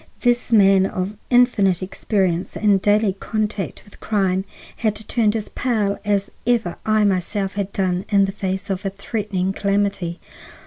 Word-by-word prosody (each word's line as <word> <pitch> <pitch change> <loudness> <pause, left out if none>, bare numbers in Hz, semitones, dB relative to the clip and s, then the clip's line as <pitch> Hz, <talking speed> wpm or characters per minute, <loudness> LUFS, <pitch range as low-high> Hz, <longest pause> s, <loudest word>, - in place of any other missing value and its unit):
This 245 0 +1
man 195 -3 +5
of 190 +3 -3
infinite 210 -8 +3
experience 185 -2 -1
and 205 -3 +3
daily 205 -1 +3
contact 215 -2 -3
with 205 - -18
crime 190 -3 0 0.3
had 215 -2 0
turned 215 0 0
as 215 -2 -3
pale 215 -6 -1
as 200 -1 0 0.2
ever 225 -8 +1
I 215 0 +3
myself 195 0 0
had 200 0 -3
done 185 -1 -1
in 200 -2 +4
face 195 0 -3
of 190 -1 -3
a 195 - -1
threatening 195 -1 -3
calamity. 200 -4 -1
200 Hz, 145 wpm, -21 LUFS, 190-215 Hz, 0.3 s, man